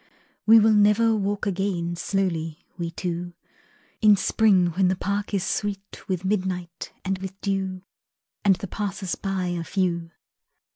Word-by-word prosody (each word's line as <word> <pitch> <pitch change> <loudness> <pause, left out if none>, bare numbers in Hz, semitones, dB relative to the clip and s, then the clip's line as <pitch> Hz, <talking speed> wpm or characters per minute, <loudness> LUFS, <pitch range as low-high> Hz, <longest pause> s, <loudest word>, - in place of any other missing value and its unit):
We 225 +1 +9
will 220 0 +5
never 210 +2 +4
walk 205 0 -1
again 185 -3 -1
Slowly, 170 -3 -2
we 170 -2 -3
two, 175 +1 -4 0.7
In 210 -2 +7
spring 190 -3 +3
when 185 +3 +2
the 185 - +2
park 200 +2 -2
is 195 -3 0
sweet 200 0 -4
With 185 -1 -2
midnight 185 -4 -2
and 190 0 -1
with 190 +1 -7
dew, 190 -2 -2 0.6
And 200 -2 +5
the 200 +2 -7
passers 195 -2 -3
by 190 -2 -2
are 175 -1 -2
few. 170 -2 -1
190 Hz, 145 wpm, -25 LUFS, 180-205 Hz, 0.7 s, We